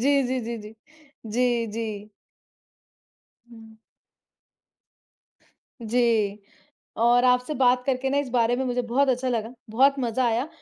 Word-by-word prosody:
जी, 280 +2 +3
जी, 255 0 -1
जी, 235 +1 -4
जी, 215 +1 -11 0.5
जी, 240 +1 0
जी। 215 -2 -5 1.4
हुँ। 225 -1 -15 2.1
जी, 220 -3 +1 0.6
और 240 +2 +4
आपसे 250 +4 +2
बात 250 -1 +2
करके 265 0 -1
ना 280 - 0
इस 285 -3 -1
बारे 240 -1 +2
में 265 - -2
मुझे 250 0 -1
बहुत 260 +3 +1
अच्छा 255 +1 0
लगा, 230 0 -3 0.2
बहुत 270 +5 +3
मज़ा 245 +1 0
आया 235 +4 0
245 Hz, 130 wpm, -24 LUFS, 225-255 Hz, 2.1 s, और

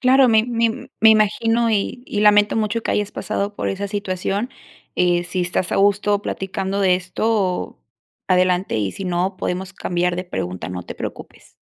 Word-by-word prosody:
Claro, 260 0 +5
me 220 -1 +4
me 230 +1 -1
me 220 0 +8
imagino, 225 +2 +3
y 215 +3 -1
y 205 - -2
lamento 210 0 +5
mucho 220 +1 0
que - - -2
hayas 205 -1 -1
pasado 205 +1 -3
por - - -2
esa 200 +1 -3
situación, 200 +2 -2 0.5
eh, 175 -1 +2
si 180 +1 -3
estás 175 +1 -1
a - - +1
gusto 205 +1 +2
platicando 195 +1 -3
de 185 -2 +4
esto, 185 +1 -1 0.5
adelante, 185 - +2
y 100 -3 -1
si 195 - -7
no, 180 +2 -1
podemos 185 +2 -3
cambiar 180 -1 -1
de 180 - -3
pregunta, 90 - -4
no 90 0 -5
te - - -7
preocupes. - - -9
195 Hz, 175 wpm, -21 LUFS, 180-215 Hz, 0.5 s, me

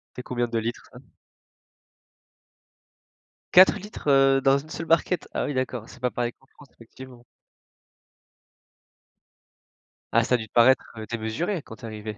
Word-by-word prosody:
C'est 125 - -7
combien 120 -1 -2
de 115 -1 -3
litres 115 +2 -4
ça? - - -13 2.5
4 185 +3 +7
litres, 205 -4 -10
heu, 135 -1 +4
dans 135 +1 +4
une 145 +3 -9
seule 165 - -6
barquette? 170 +2 +1
Ah - - -1
oui 145 - -3
d'accord, 130 -3 -3
c'est 125 - -15
pas 125 -1 0
pareil 120 -1 -2
qu'en 135 - -29
France 145 0 -19
effectivement. 125 +1 -14 2.9
Ah 115 - +5
ça 125 +2 +2
a - - +2
dû 110 -2 -7
te - - -44
paraître, 120 +3 +4
heu, 110 - -6
démesuré 115 - -3
quand 110 - -11
tu - - -20
es - - -5
arrivée. 110 -1 -7
125 Hz, 165 wpm, -25 LUFS, 115-140 Hz, 2.9 s, 4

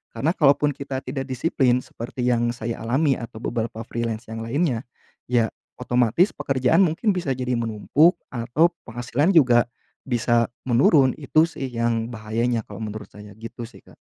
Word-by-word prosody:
Karena 160 +4 +1
kalaupun 145 -2 +3
kita 135 -1 -5
tidak 135 +1 -4
disiplin, 130 -2 +1
seperti 120 +1 -6
yang 120 -1 +2
saya 115 0 -5
alami 135 +5 +2
atau 115 -1 -8
beberapa 115 -1 -3
freelance 115 0 -4
yang 115 0 -5
lainnya, 125 0 0 0.5
ya, 115 -3 +2 0.3
otomatis 125 - +2
pekerjaan 135 +5 +1
mungkin 185 +6 +1
bisa 155 -8 -2
jadi 125 0 -3
menumpuk, 120 - +3 0.2
atau 125 +8 +2 0.2
penghasilan 120 - 0
juga, 120 -6 +5 0.4
bisa 120 -2 +2 0.2
menurun. 130 +2 +5
Itu 150 +2 +3
sih 135 -4 -5
yang 115 -1 0
bahayanya, 115 +2 -1
kalau 105 0 -9
menurut 105 -1 -6
saya 105 +1 -12
gitu 115 +1 -8
sih, 125 - -17
Kak. - - -19
120 Hz, 155 wpm, -23 LUFS, 115-140 Hz, 0.5 s, juga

